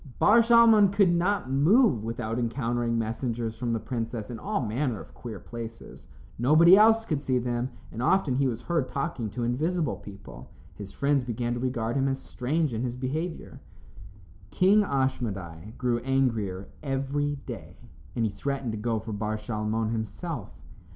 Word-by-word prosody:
Bar 220 +3 +6
Shalmon 230 -4 +6
could 200 -3 +4
not 175 -5 0
move 150 - +4
without 115 0 -3
encountering 120 -1 -1
messengers 115 0 -2
from 120 +1 -3
the 115 - 0
princess 115 -1 -4
in 115 - -6
all 205 - -2
manner 120 0 -1
of - - -12
queer 110 -5 -8
places. 115 -1 -9 0.3
Nobody 155 +8 +7
else 225 +2 +5
could 155 -7 -1
see 130 -3 0
them, 120 0 -1 0.2
and 115 - -5
often 150 0 +2
he 135 +1 +2
was 120 -1 -4
heard 165 -7 0
talking 135 -6 -3
to 120 +4 -4
invisible 155 +7 0
people. 100 - -12 0.2
His 100 -2 -9
friends 140 +3 +1
began 120 0 -2
to 120 - -3
regard 120 -2 -2
him 135 0 +2
as 135 0 -1
strange 145 +3 -1
in 110 - -2
his 125 -1 -2
behavior. 155 +7 -4 0.9
King 195 - +4
Ashmedai 110 - -3
grew 120 -2 0
angrier 115 -8 -1
every 145 +1 -1
day, - - -8 0.4
and 115 - +1
he 110 - -1
threatened 135 +3 -3
to 110 - -5
go 115 +1 -1
for 110 0 -5
Bar 105 +1 -2
Shalmon 110 0 -2
himself. 115 - -4
125 Hz, 165 wpm, -27 LUFS, 115-145 Hz, 0.9 s, Nobody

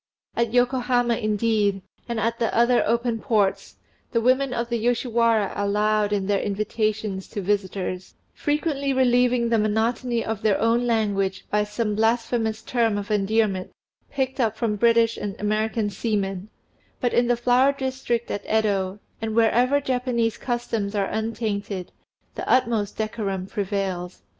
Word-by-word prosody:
At 235 -1 0
Yokohama 245 -1 +2
indeed, 210 -3 +1 0.3
and 235 -1 -1
at 230 +2 -1
the 230 - +1
other 240 +1 +4
open 235 0 0
ports, 210 -4 0 0.4
the 230 - +2
women 255 +3 +2
of 235 -1 -2
the 235 -1 -1
Yoshiwara 230 -3 +1
are 200 - -1
loud 210 0 +1
in 200 -2 0
their 200 0 +1
invitations 215 -1 -2
to - - -6
visitors, 190 -2 -2 0.2
frequently 290 -2 -1
relieving 245 -2 +3
the 230 -1 +3
monotony 230 +3 0
of 220 -2 -3
their 210 -3 +2
own 230 +2 +2
language 200 -4 0
by 210 0 +2
some 210 +1 -2
blasphemous 225 0 0
term 230 -4 +1
of 205 +1 -5
endearment 205 -2 +1 0.4
picked 265 -1 -2
up 220 -3 +1
from 225 -3 0
British 230 +1 +3
and 200 -2 -5
American 215 0 0
seamen; 195 -2 -2 0.5
but 245 - 0
in 240 0 +3
the 245 0 +2
Flower 250 +3 +4
District 260 -3 -2
at 205 - -3
Yedo, 200 -3 0 0.2
and 220 -1 -3
wherever 245 +5 +3
Japanese 250 -4 0
customs 230 -4 -3
are 200 -1 +1
untainted, 215 -3 -3 0.4
the - - -5
utmost 230 -5 +1
decorum 205 -4 -2
prevails. 190 -3 -3
225 Hz, 145 wpm, -24 LUFS, 205-240 Hz, 0.5 s, other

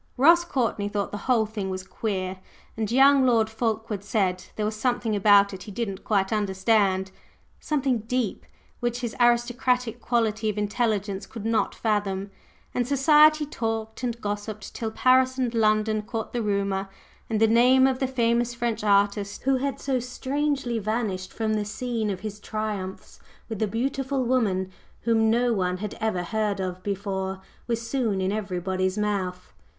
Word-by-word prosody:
Ross 335 +6 +6
Courtney 230 -10 -1
thought 205 -1 -2
the 205 - -4
whole 230 -3 +4
thing 210 -3 -4
was 185 0 -4
"queer;" 190 -2 -3 0.4
and 220 -1 -2
young 270 +2 +6
Lord 225 -3 +3
Fulkeward 220 -3 -2
said 190 -4 0
there 210 - -1
was 215 +1 -2
something 240 -1 0
about 200 0 +5
it 190 - -8
he 210 - -9
didn't 200 -2 -4
quite 195 -1 +1
understand, 190 -1 +1 0.5
something 275 -6 0
"deep," 230 0 -2 0.3
which 240 0 -2
his 235 -3 -4
aristocratic 245 0 +2
quality 220 -2 0
of 210 - -3
intelligence 205 -2 -1
could 220 -2 -8
not 225 -1 +1
fathom. 200 -3 -1 0.4
And 245 -1 0
society 300 +2 +5
talked 225 -5 -4
and 240 -2 -2
gossiped 205 0 -5
till 225 - -3
Paris 255 +3 +3
and 250 -3 0
London 215 -1 +2
caught 225 +1 -5
the 240 - -1
rumor, 200 -2 -1 0.4
and 220 -2 0
the 225 - +6
name 250 +4 +5
of 260 -1 +1
the 265 - +1
famous 240 -1 +1
French 235 -2 -2
artist, 200 0 +1
who 270 0 +3
had 275 +1 -2
so 265 -2 0
strangely 260 0 -2
vanished 210 -3 -2
from 220 -1 -1
the 210 -1 0
scene 225 +1 -3
of 190 -2 -4
his 210 -1 -6
triumphs 210 -3 -5 0.3
with 220 -3 -5
a 215 - +2
beautiful 265 +4 -1
woman 205 -7 +1 0.3
whom 225 -1 +2
no 240 +1 +2
one 180 -3 0
had 210 +2 -5
ever 215 -5 0
heard 210 +1 -1
of 185 -1 -3
before, 190 -1 -3 0.3
was 230 -1 -2
soon 230 -8 0
in 190 0 0
everybody's 185 -2 -2
mouth. 195 -4 -2
220 Hz, 165 wpm, -25 LUFS, 200-245 Hz, 0.5 s, Ross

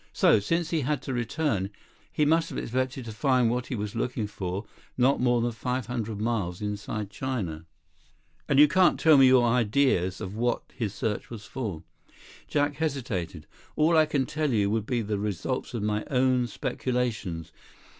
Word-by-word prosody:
So, 110 - +5
since 165 - -1
he 165 -2 +1
had 140 0 -1
to 135 - -4
return, 120 -5 -1 0.4
he 150 - +1
must 160 +2 +2
have - - -6
expected 130 +1 -2
to 115 - -6
find 125 0 +2
what 125 0 -2
he 130 - -3
was 105 -2 -4
looking 115 -1 -1
for 100 -1 -4 0.3
not 130 +2 +3
more 120 -1 +3
than 120 +1 0
five 125 +1 -3
hundred 115 -4 -4
miles 105 -6 -1
inside 105 0 -4
China." 95 -13 -4 0.8
"And 140 - +3
you 150 +1 +9
can't 180 +4 +4
tell 160 -1 +6
me 135 -2 +7
your 130 -1 +6
ideas 115 -5 +2
of 95 +2 -6
what 120 +2 0
his 105 -4 -3
search 105 -2 -2
was 110 -3 -8
for?" 105 -11 -5 0.6
Jack 145 -1 0
hesitated. 115 - -3 0.3
"All 160 +2 +3
I 155 -1 +5
could 140 -3 0
tell 155 -1 -1
you 105 -3 +2
would 110 -1 -1
be 120 -3 0
the 105 -1 -2
results 105 +6 -3
of 110 - -2
my 105 0 0
own 130 -2 +2
speculations. 115 -11 -3
120 Hz, 175 wpm, -27 LUFS, 105-135 Hz, 0.8 s, you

